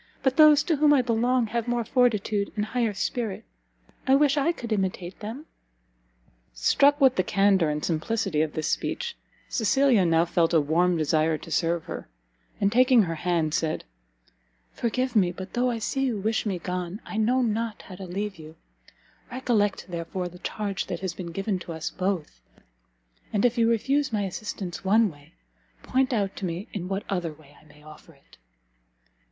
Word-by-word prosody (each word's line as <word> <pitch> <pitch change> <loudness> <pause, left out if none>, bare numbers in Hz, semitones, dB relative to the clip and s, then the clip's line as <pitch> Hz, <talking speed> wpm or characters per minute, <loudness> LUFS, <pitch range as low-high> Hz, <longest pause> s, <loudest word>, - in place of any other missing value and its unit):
But 265 -1 +2
those 305 -1 +7
to 325 -4 0
whom 295 0 +5
I 260 - +3
belong 240 +1 +2
have 235 0 -1
more 240 -1 0
fortitude 215 -5 +1
and 210 -1 -1
higher 230 -2 -1
spirit. 220 0 -3 0.6
I 265 - +6
wish 285 0 +4
I 290 +3 +2
could 235 -9 -4
imitate 190 -2 -3
them!" 230 +9 -7 1.1
Struck 280 - +4
with 265 -3 +4
the 185 - +3
candour 195 -5 +3
and 150 0 -2
simplicity 175 0 0
of 155 -1 -1
this 155 0 -2
speech, 475 -1 -2 0.3
Cecilia 250 -2 +3
now 165 -1 +3
felt 170 -1 +1
a - - +6
warm 170 +4 +2
desire 155 0 +1
to - - -12
serve 170 -1 +1
her, - - -7 0.5
and 200 0 +2
taking 250 0 +5
her 165 -3 -2
hand, 165 -1 0
said, 160 -1 -1 0.9
"Forgive 255 +2 -2
me, 185 -5 +4
but 185 +1 -9
though 250 +1 +1
I 235 - -1
see 270 +4 -1
you 235 -4 -1
wish 220 +2 -1
me 190 -3 -1
gone, 180 +2 -4
I 215 - -6
know 245 +4 +2
not 225 -1 -2
how 190 - -11
to 190 - -7
leave 200 +2 -4
you: 155 0 -12 0.8
recollect, 235 -5 0
therefore, 175 +1 -4
the 180 +1 -14
charge 200 0 -3
that 175 - -4
has 190 -2 -3
been 175 -2 -7
given 195 +2 -2
to 170 -1 -7
us 160 -1 -4
both, 180 - -3 0.9
and 205 +2 +1
if 245 -1 +3
you 230 -1 +3
refuse 270 +5 +1
my 210 -2 0
assistance 190 -2 -5
one 210 +1 +4
way, 145 - -19 0.5
point 265 +1 +1
out 200 -5 -1
to 195 - -3
me 175 +4 -4
in 180 -3 -4
what 195 +1 -2
other 175 -5 -2
I 145 -1 -19
may 150 0 -19
offer 155 +2 -14
it." 140 - -23
200 Hz, 180 wpm, -26 LUFS, 175-240 Hz, 1.1 s, those